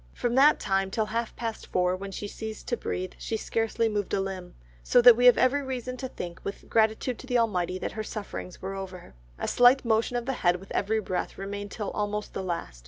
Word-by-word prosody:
From 240 - -1
that 280 +4 +6
time 195 0 0
till 215 +2 0
half 230 +2 -3
past 225 -2 -5
four 180 0 +1
when 195 +1 -7
she 205 +2 -5
ceased 220 +1 -7
to 240 - +1
breathe, 185 -5 -4
she 225 - -2
scarcely 225 +1 0
moved 205 -2 -2
a - - 0
limb, 190 -2 -5 0.3
so 245 - +4
that 245 -1 +9
we 245 +2 +5
have 245 - +8
every 280 +3 +3
reason 255 -2 -4
to 260 - -4
think 175 -8 -7
with 200 - -6
gratitude 220 +2 +1
to 260 - -10
the 245 -1 +2
Almighty, 185 -6 0
that - - -4
her 220 - -4
sufferings 200 -4 -7
were 195 +1 -3
over. 190 - -8 0.2
A - - -3
slight 245 +2 +5
motion 225 +2 +1
of 240 - -3
the 270 - -1
head 175 -1 +4
with 190 +2 -10
every 220 +2 +1
breath 185 -3 -3
remained 200 +1 -5
till 210 0 -4
almost 210 0 -3
the - - -3
last. 170 - -4
215 Hz, 230 wpm, -27 LUFS, 190-240 Hz, 0.3 s, that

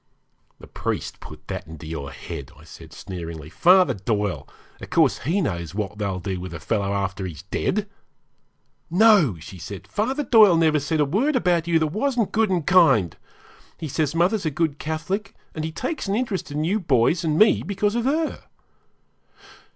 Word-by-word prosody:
'The - - -12
priest - - -4
put - - -12
that - - -5
into 80 0 -10
your 80 -3 -5
head,' - - -8
I - - -16
said - - -13
sneeringly; 85 -4 -8
'Father 180 - +5
Doyle 105 -1 -2 0.3
of - - -8
course - - +3
he 175 +9 0
knows 85 - -3
what 105 -1 -4
they'll 100 -3 -2
do 95 -1 -4
with 90 -1 -7
a - - -6
fellow 100 +5 -1
after 95 -1 -2
he's 80 -1 -9
dead.' 210 - -1 1.0
'No!' 180 - +5
she 90 +4 -11
said, 100 +4 -8
'Father 260 +8 -1
Doyle 215 -8 +6
never 160 -2 +3
said 150 +2 -1
a - - +4
word 235 - +1
about 175 -8 +1
you 170 -1 +3
that 160 - +2
wasn't 240 0 0
good 220 -1 +2
and 175 -5 0
kind. 160 - +4 0.6
He 160 - -5
says 150 +1 -1
mother's 185 +5 +2
a 160 - 0
good 150 -1 -1
Catholic, 185 +7 -3 0.2
and 155 - -4
he 160 - -3
takes 255 - -4
an 195 - 0
interest 225 -8 -2
in 150 +1 -2
you 195 +7 +1
boys 155 - +2
and 155 -2 0
me 215 +4 +5
because 205 +1 -1
of 235 0 -1
her.' 310 +4 -1
160 Hz, 180 wpm, -23 LUFS, -, 1.0 s, Doyle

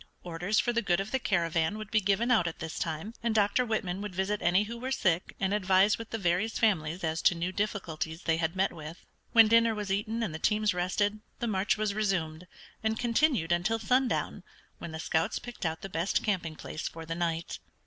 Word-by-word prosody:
Orders 180 +5 -2
for 240 - +1
the 235 - +1
good 180 -5 +1
of 195 +2 -4
the 265 - +1
caravan 170 -3 0
would 215 -1 -8
be 215 - +3
given 205 +5 +1
out 215 -8 +4
at 165 - -4
this 160 -1 -5
time, 165 +7 -3
and 230 -1 0
Dr. 210 +3 +3
Whitman 200 -5 -2
would 205 -3 -6
visit 195 +2 -1
any 180 +4 +3
who 230 +2 -7
were 255 +2 -4
sick 180 -8 0
and 195 0 0
advise 195 +1 +3
with 230 - -7
the 225 - -3
various 190 +3 0
families 175 -5 +1
as 160 0 -1
to 175 - +4
new 170 +2 -2
difficulties 180 -5 -3
they 165 -1 +1
had 165 +1 -1
met 190 +1 +1
with. 160 +1 -9 0.3
When 225 -2 +8
dinner 230 0 +4
was 205 -2 -4
eaten 215 +4 -1
and 175 - -3
the 160 - -5
teams 210 +1 +2
rested 205 +4 0 0.2
the - - -3
march 205 -2 +1
was 215 -1 0
resumed, 180 -5 -1 0.4
and 220 0 0
continued 235 - +2
until 175 +6 +2
sundown, 250 +3 0 0.4
when 170 - -7
the 160 - -6
scouts 160 0 0
picked 245 -8 -5
out 160 0 -4
the - - -5
best 175 +1 -1
camping 175 -6 -1
place 155 - -5
for 165 0 -8
the 165 - -3
night. 165 -1 -2
195 Hz, 220 wpm, -29 LUFS, 170-215 Hz, 0.4 s, When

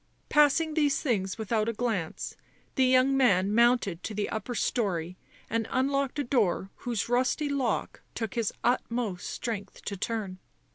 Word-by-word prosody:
Passing 300 +2 +4
these 295 -3 +2
things 195 -8 -1
without 220 0 0
a - - -1
glance 215 -8 -2 0.4
the 265 - +3
young 255 +1 +4
man 205 -7 +3
mounted 235 -6 +3
to 215 - -5
the 205 0 -1
upper 235 +3 -3
storey 180 -8 -1 0.3
and 225 0 -1
unlocked 275 +1 0
a 290 - +1
door 210 -7 +1
whose 235 -4 -2
rusty 255 +5 +1
lock 270 -5 -1
took 225 -3 -3
his 230 -3 0
utmost 235 -6 -1
strength 215 -4 -5
to 200 - -3
turn. 200 -2 -3
230 Hz, 150 wpm, -28 LUFS, 205-260 Hz, 0.4 s, Passing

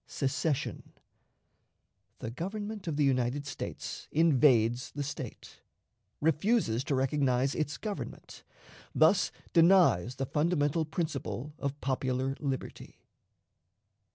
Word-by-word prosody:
Secession. 140 +1 -2 1.2
The 115 - -5
Government 205 - -5
of 155 -3 -2
the 150 - +3
United 130 +1 +1
States 135 - -6
invades 130 -7 +4
the 145 - -2
State; 145 - -7 0.6
refuses 160 - +2
to 145 - 0
recognize 135 -1 +1
its 155 -1 -2
Government; 210 -2 -7 0.5
thus - - +4 0.2
denies 165 - +5
the 135 0 -2
Fundamental 150 +1 +1
Principle 150 -3 -4
of 140 +1 -3
Popular 130 0 -1
Liberty. 135 -3 -5
145 Hz, 100 wpm, -30 LUFS, 130-160 Hz, 1.2 s, denies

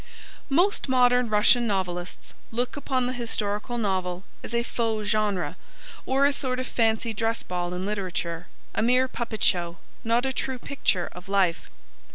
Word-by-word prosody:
Most 350 +2 +2
modern 250 -1 +4
Russian 215 +3 +5
novelists 180 -3 -3 0.2
look 245 +5 -2
upon 265 -3 0
the 250 - -1
historical 225 -1 -1
novel 185 -4 -1 0.2
as 235 - -5
a 235 - +2
faux 225 -3 -1
genre, 205 -4 0 0.5
or 270 +1 +3
a 285 - +4
sort 255 -2 -1
of 255 - -2
fancy 225 -2 +1
dress 225 +1 -1
ball 175 -1 -3
in 180 +1 -3
literature, 180 -4 -3 0.3
a - - 0
mere 250 +3 +4
puppet 235 -4 -4
show, 170 -2 +2 0.3
not 235 +2 +2
a 265 - 0
true 260 0 -2
picture 230 -8 0
of 180 +2 -11
life. 190 -4 +1
225 Hz, 160 wpm, -26 LUFS, 190-250 Hz, 0.5 s, Russian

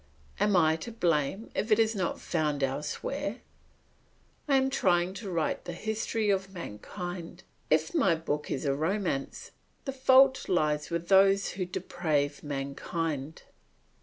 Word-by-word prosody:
Am 205 -2 +3
I 160 -2 +4
to 200 +9 -7
blame 175 -1 0
if 220 - -2
it 215 - +6
is 225 -1 +3
not 190 -5 -2
found 150 -4 -1
elsewhere? 135 +2 -3 1.1
I 280 - +3
am 265 0 +3
trying 180 -6 +2
to 200 +1 -7
write 165 -3 -1
the 175 - -5
history 220 +2 -1
of 195 0 -1
mankind. 175 - -7 0.3
If 155 +1 +2
my 170 -4 +3
book 150 -2 -3
is 135 - -2
a 140 - +2
romance, 160 -1 -2 0.3
the 270 - -3
fault 265 0 +5
lies 150 -4 +1
with 170 0 -3
those 195 0 +5
who 185 0 -3
deprave 150 -5 -1
mankind. 145 +1 -4
175 Hz, 140 wpm, -29 LUFS, 150-200 Hz, 1.1 s, it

